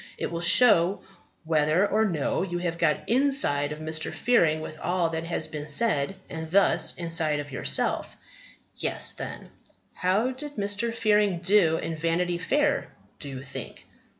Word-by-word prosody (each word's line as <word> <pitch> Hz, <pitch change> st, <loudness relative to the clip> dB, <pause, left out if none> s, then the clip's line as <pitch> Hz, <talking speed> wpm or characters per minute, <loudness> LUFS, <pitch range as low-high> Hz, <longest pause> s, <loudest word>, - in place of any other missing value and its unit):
It -, -, -4 dB
will 170 Hz, 0 st, -4 dB
show 190 Hz, -1 st, +5 dB, 0.4 s
whether 160 Hz, +3 st, +2 dB
or 220 Hz, +2 st, +1 dB
no 165 Hz, -8 st, -1 dB
you 175 Hz, -2 st, -3 dB
have 170 Hz, -1 st, -3 dB
got 160 Hz, -3 st, 0 dB
inside 240 Hz, -, +2 dB
of 150 Hz, -, -5 dB
Mr. 155 Hz, 0 st, -3 dB
Fearing 165 Hz, -11 st, +2 dB
with 155 Hz, 0 st, -8 dB
all 175 Hz, -2 st, -1 dB
that 160 Hz, 0 st, -4 dB
has 165 Hz, -, -3 dB
been 150 Hz, -1 st, -7 dB
said; 150 Hz, -1 st, +1 dB
and 160 Hz, -1 st, -7 dB
thus, 175 Hz, -3 st, +2 dB
inside 165 Hz, -3 st, +1 dB
of 145 Hz, 0 st, -7 dB
yourself. 135 Hz, -, -1 dB, 0.6 s
Guess, -, -, 0 dB
then. -, -, -8 dB, 0.4 s
How 200 Hz, +8 st, 0 dB
did 290 Hz, +3 st, -8 dB
Mr. 205 Hz, +3 st, -2 dB
Fearing 210 Hz, -4 st, +1 dB
do 175 Hz, -2 st, +3 dB
in 165 Hz, 0 st, -4 dB
Vanity 170 Hz, +2 st, -1 dB
Fair, 285 Hz, -, 0 dB, 0.3 s
do 145 Hz, -, -8 dB
you 135 Hz, -1 st, -7 dB
think? 130 Hz, -, -9 dB
170 Hz, 155 wpm, -26 LUFS, 155-205 Hz, 0.6 s, show